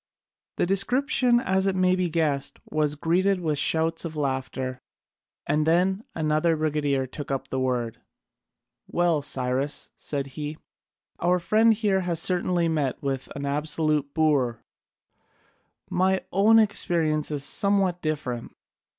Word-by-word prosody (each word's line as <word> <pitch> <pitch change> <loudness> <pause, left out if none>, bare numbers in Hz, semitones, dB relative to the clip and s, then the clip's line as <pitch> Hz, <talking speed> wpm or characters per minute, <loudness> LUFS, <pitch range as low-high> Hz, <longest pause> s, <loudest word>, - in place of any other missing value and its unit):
The - - +2
description, 245 - +2
as 190 -3 +1
may 185 0 +3
be 180 -1 0
guessed, 155 -4 0
was 150 -1 +1
greeted 180 +5 +1
with 155 -4 -1
shouts 160 +2 0
of 165 -2 -5
laughter, 130 -2 -3 0.6
and 150 +1 +1
then 185 +5 +2
another 155 +1 +1
brigadier 145 -3 0
took 140 +2 -8
up 135 -1 -3
the 130 - -2
word: 125 -3 -2 0.9
"Well, 170 -3 +1
Cyrus," 130 +1 -2
said 140 -2 -3
he, 150 0 -5 0.6
"our 180 +1 +2
friend 215 +6 +3
here 210 -3 +1
has 175 -3 -1
certainly 175 -1 +1
met 150 -6 -1
with 135 -1 -2
an 140 0 -4
absolute 150 0 0
boor: 140 -7 +1 1.2
my 190 +1 +1
own 210 +4 +5
experience 170 -8 +1
is 145 -2 -3
somewhat 195 +1 +2
different. 145 -6 -3
155 Hz, 125 wpm, -25 LUFS, 140-185 Hz, 1.2 s, own